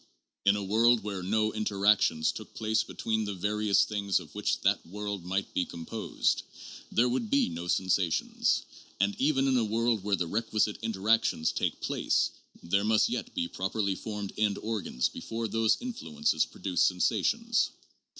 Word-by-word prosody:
In 100 0 +5
a 105 - -2
world 115 +4 +3
where 100 -3 -4
no 110 +3 +1
interactions 100 -6 +2
took - - -10
place 110 0 +1
between 110 -1 -2
the 105 -1 -4
various 105 +2 +2
things 100 -3 0
of 80 -4 -13
which - - -1
that - - +2
world 100 0 -5
might 95 +2 -2
be 90 - +1
composed, 85 +7 -2 0.5
there 120 +2 +3
would 120 -3 -1
be 140 - +3
no 85 +1 -6
sensations; 95 -2 +1 0.4
and 100 +1 +1
even 135 -1 +2
in 130 - +3
a 120 - +2
world 115 -1 0
where 100 -1 +2
the 90 - -1
requisite 110 +2 0
interactions 110 -5 +1
take - - -2
place, - - +1 0.3
there 100 +4 +1
must 110 0 +3
yet - - -4
be 85 - 0
properly 95 +2 -1
formed 105 0 -5
end 105 -2 +2
organs 105 - -1
before 115 0 -4
those 115 0 +2
influences 80 - -1
pro - - -16
duce 90 -3 0
sensations. 230 - +2
105 Hz, 160 wpm, -29 LUFS, 95-110 Hz, 0.5 s, In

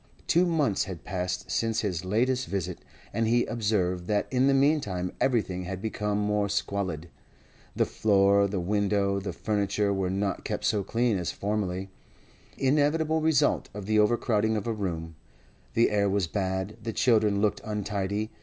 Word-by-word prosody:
Two 175 +2 +3
months 150 - +1
had 90 -5 -7
passed 90 -1 -3
since 115 -1 0
his 90 -6 -2
latest 125 +7 +1
visit, 90 -3 -3 0.3
and 115 +1 +1
he 120 +1 +3
observed 95 -6 -1
that 105 -1 +1
in 130 +1 +3
the 140 - +4
meantime 135 - +1
everything 95 -8 0
had 95 +1 -4
become 105 0 -2
more 105 0 0
squalid. 95 -5 -2 0.7
The - - +2
floor, 100 -1 +3
the 100 -1 -2
window, 100 +1 +1
the 95 - -4
furniture, 100 -1 0
were 95 -2 -1
not 100 +1 -2
kept - - -3
so 105 -2 +1
clean 115 -1 +1
as 90 - -2
formerly—inevitable 130 - -2
result 155 -3 +2
of 105 -2 -6
the 110 +1 +2
overcrowding 110 0 +2
of 105 - -4
a 115 - -1
room; 80 -6 -4 0.6
the 115 - +4
air 100 -1 +2
was 100 -1 +1
bad, 95 +3 -2
the 115 0 -4
children 110 -4 +3
looked 105 0 +1
untidy. 105 0 -2
105 Hz, 155 wpm, -27 LUFS, 95-115 Hz, 0.7 s, the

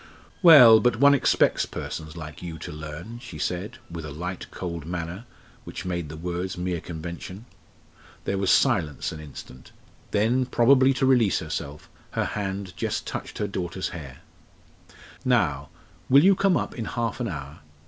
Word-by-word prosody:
"Well, 130 - +9
but 120 +1 +2
one 140 +4 +6
expects 140 - +2
persons 80 +1 -6
like 75 -2 -8
you 85 -2 -6
to - - -7
learn," 75 +9 -8
she 120 -10 -10
said, 90 +6 -3
with 85 -1 -7
a 75 - -6
light, 90 +4 -6
cold 85 -3 -5
manner, 85 +6 -5 0.4
which 90 - -7
made 85 -4 -3
the 75 - -8
words 90 +2 -4
mere 90 -2 -2
convention. 85 +5 -7 0.8
There 100 - -1
was 95 -1 0
silence 75 -3 +2
an 80 - -8
instant; 65 -4 -11 0.4
then, 120 +5 +1
probably 130 +2 +5
to 130 - +1
release 125 -6 +4
herself, 75 -2 -5 0.3
her - - 0
hand 95 -3 -4
just - - -2
touched - - -6
her 105 - -1
daughter's 90 -1 -3
hair. 70 -7 -9 1.0
"Now, - - +1 0.4
will 140 +3 +7
you 195 +2 +7
come 195 -2 +2
up - - -3
in 115 - -5
half 115 -1 -3
an 120 - -1
hour? 75 -2 -7
90 Hz, 160 wpm, -25 LUFS, 80-115 Hz, 1.0 s, Well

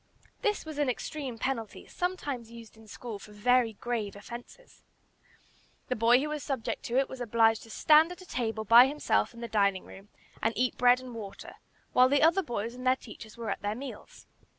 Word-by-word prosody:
This 420 -6 0
was 310 -2 -6
an 290 -3 +2
extreme 260 0 -4
penalty, 230 -2 -4
sometimes 290 -10 -4
used 230 -1 -12
in 220 0 -17
school 220 0 -7
for 210 - -13
very 235 +2 +2
grave 220 -2 -3
offences. 240 - -11 1.1
The 255 - 0
boy 235 +2 +5
who 300 +3 -2
was 300 -1 -3
subject 265 -6 -3
to 240 - -1
it 270 - +3
was 260 - -9
obliged 225 -1 +3
to 225 - -14
stand 310 +8 +5
at 360 - -9
a - - -15
table 225 -7 -3
by 235 +4 +8
himself 295 +2 0
in 235 - -10
the 235 - -4
dining 200 -3 +1
room 195 +2 -13 0.3
and 225 +1 0
eat 250 0 +1
bread 245 0 +4
and 255 -1 -9
water, 210 -4 -8 0.4
while 255 +1 +6
the 285 +1 +3
other 335 +4 +5
boys 235 - -4
and 255 +1 -6
their 255 - +5
teachers 220 -2 -12
were 230 -2 -3
at - - -4
their 205 +1 -2
meals. 265 +2 -9
240 Hz, 200 wpm, -29 LUFS, 225-270 Hz, 1.1 s, by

